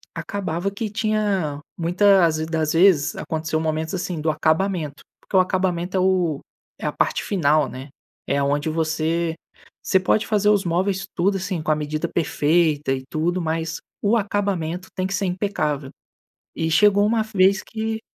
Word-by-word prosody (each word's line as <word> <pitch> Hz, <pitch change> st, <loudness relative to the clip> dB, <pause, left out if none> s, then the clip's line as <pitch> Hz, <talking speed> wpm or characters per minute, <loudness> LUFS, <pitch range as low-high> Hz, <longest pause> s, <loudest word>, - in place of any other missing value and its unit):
acabava 175 Hz, +2 st, -3 dB
que 210 Hz, +2 st, -4 dB
tinha 205 Hz, -8 st, -1 dB, 0.2 s
muita 185 Hz, +2 st, +4 dB
as 155 Hz, -1 st, 0 dB
das 160 Hz, -2 st, 0 dB
vezes 165 Hz, -4 st, +4 dB
aconteceu 160 Hz, 0 st, -2 dB
momentos 160 Hz, 0 st, -2 dB
assim, 180 Hz, -2 st, -3 dB
do 160 Hz, -, 0 dB
acabamento 155 Hz, -1 st, 0 dB, 0.2 s
porque -, -, -7 dB
o -, -, +8 dB
acabamento 185 Hz, -1 st, 0 dB
é -, -, +2 dB
o 180 Hz, -5 st, +1 dB, 0.4 s
é -, -, -6 dB
a -, -, 0 dB
parte -, -, 0 dB
final, 155 Hz, -6 st, +2 dB
né? 130 Hz, +3 st, -9 dB, 0.4 s
É 140 Hz, -, +1 dB
aonde 145 Hz, +2 st, 0 dB
você 160 Hz, +1 st, -1 dB, 0.5 s
você 190 Hz, -, +3 dB
pode 195 Hz, +3 st, +1 dB
fazer 210 Hz, -1 st, +2 dB
os 205 Hz, -2 st, +3 dB
móveis 190 Hz, +3 st, 0 dB
tudo 195 Hz, +3 st, +1 dB
assim, 185 Hz, -3 st, -3 dB
com 155 Hz, -, 0 dB
a -, -, +3 dB
medida 150 Hz, 0 st, -2 dB
perfeita 155 Hz, -2 st, +1 dB
e 130 Hz, -1 st, -4 dB
tudo, 170 Hz, +4 st, -1 dB
mas 160 Hz, 0 st, -2 dB, 0.2 s
o 215 Hz, +3 st, +3 dB
acabamento 190 Hz, -4 st, -2 dB
tem 185 Hz, -, -1 dB
que 190 Hz, -, -4 dB
ser 195 Hz, +1 st, -1 dB
impecável. 155 Hz, -7 st, -2 dB, 0.7 s
E 160 Hz, -, -1 dB
chegou 205 Hz, +5 st, +5 dB
uma 220 Hz, +1 st, +2 dB
vez 195 Hz, -2 st, +3 dB
que 220 Hz, 0 st, -4 dB
175 Hz, 165 wpm, -22 LUFS, 155-195 Hz, 0.7 s, o